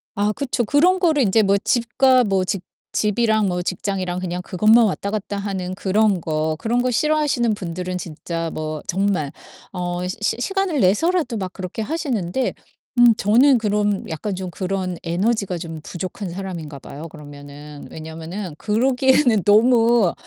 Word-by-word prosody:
아 205 Hz, +1 st, +1 dB
그쵸. 250 Hz, +1 st, -2 dB
그런 330 Hz, -, +3 dB
거를 315 Hz, -6 st, +3 dB
인제 220 Hz, +1 st, +3 dB
뭐 200 Hz, 0 st, +3 dB
집과 250 Hz, +4 st, +3 dB
뭐 195 Hz, -4 st, +1 dB
직 190 Hz, -1 st, -2 dB, 0.3 s
집이랑 215 Hz, 0 st, +2 dB
뭐 180 Hz, -1 st, -1 dB
직장이랑 185 Hz, -1 st, -2 dB
그냥 180 Hz, 0 st, -4 dB
그것만 215 Hz, +6 st, +4 dB
왔다 200 Hz, -1 st, -2 dB
갔다 205 Hz, -1 st, -3 dB
하는 190 Hz, -2 st, -3 dB
그런 195 Hz, 0 st, +1 dB
거. 155 Hz, 0 st, -1 dB
그런 235 Hz, +5 st, 0 dB
거 255 Hz, -, +1 dB
싫어하시는 285 Hz, -4 st, +1 dB
분들은 180 Hz, -1 st, -4 dB
진짜 165 Hz, -1 st, -5 dB
뭐 155 Hz, -1 st, -4 dB
정말 190 Hz, -6 st, 0 dB, 0.4 s
어 175 Hz, -1 st, -3 dB
시 185 Hz, -, -3 dB
시 210 Hz, -, 0 dB
시간을 385 Hz, +2 st, 0 dB
내서라도 250 Hz, -, +2 dB
막 190 Hz, -3 st, -4 dB
그렇게 185 Hz, +3 st, -5 dB
하시는데 255 Hz, -, -2 dB, 0.5 s
음 240 Hz, -2 st, +7 dB
저는 250 Hz, +6 st, +5 dB
그런 205 Hz, -2 st, 0 dB
약간 185 Hz, +5 st, -3 dB
좀 185 Hz, -1 st, -5 dB
그런 185 Hz, -1 st, -3 dB
에너지가 190 Hz, +2 st, 0 dB
좀 165 Hz, -2 st, -7 dB
부족한 185 Hz, +4 st, -6 dB
사람인가 170 Hz, -5 st, -6 dB
봐요 145 Hz, +4 st, -9 dB
그러면은. 145 Hz, -1 st, -11 dB
왜냐면은 160 Hz, +3 st, -7 dB
그러기에는 250 Hz, +1 st, +3 dB
너무 225 Hz, -1 st, +4 dB
200 Hz, 325 characters per minute, -21 LUFS, 175-235 Hz, 0.5 s, 음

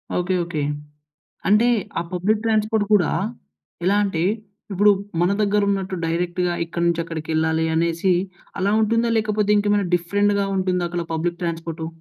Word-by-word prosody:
Okay, 180 Hz, +1 st, 0 dB
okay. 170 Hz, -3 st, -3 dB, 0.9 s
అంటే 210 Hz, +4 st, +4 dB, 0.3 s
ఆ -, -, -1 dB
public 200 Hz, +4 st, 0 dB
transport 215 Hz, -1 st, +1 dB
కూడా 190 Hz, -6 st, +4 dB, 0.7 s
ఎలా 190 Hz, +3 st, +3 dB
అంటే, 190 Hz, -5 st, -1 dB, 0.5 s
ఇప్పుడు 205 Hz, +2 st, +5 dB, 0.3 s
మన 175 Hz, +2 st, +3 dB
దగ్గరున్నట్టు 200 Hz, -2 st, +1 dB
డైరెక్ట్‌గా 175 Hz, +1 st, -1 dB
ఇక్కడి 170 Hz, +1 st, -2 dB
నుంచి 170 Hz, -1 st, +1 dB
అక్కడికెళ్ళాలి 160 Hz, 0 st, -1 dB
అనేసి 170 Hz, +3 st, +1 dB, 0.5 s
అలా 200 Hz, +3 st, +1 dB
ఉంటుందా? 230 Hz, +2 st, +2 dB
లేకపోతే 210 Hz, -1 st, +1 dB
ఇంకేమైనా 205 Hz, -1 st, +1 dB
డిఫరెంట్‌గా 200 Hz, +3 st, +1 dB
ఉంటుందా 180 Hz, -2 st, 0 dB
అక్కడ 175 Hz, 0 st, -3 dB
పబ్లిక్ 170 Hz, +2 st, -2 dB
ట్రాన్స్‌పోర్టు? 165 Hz, -1 st, -4 dB
185 Hz, 130 wpm, -22 LUFS, 170-205 Hz, 0.9 s, ఇప్పుడు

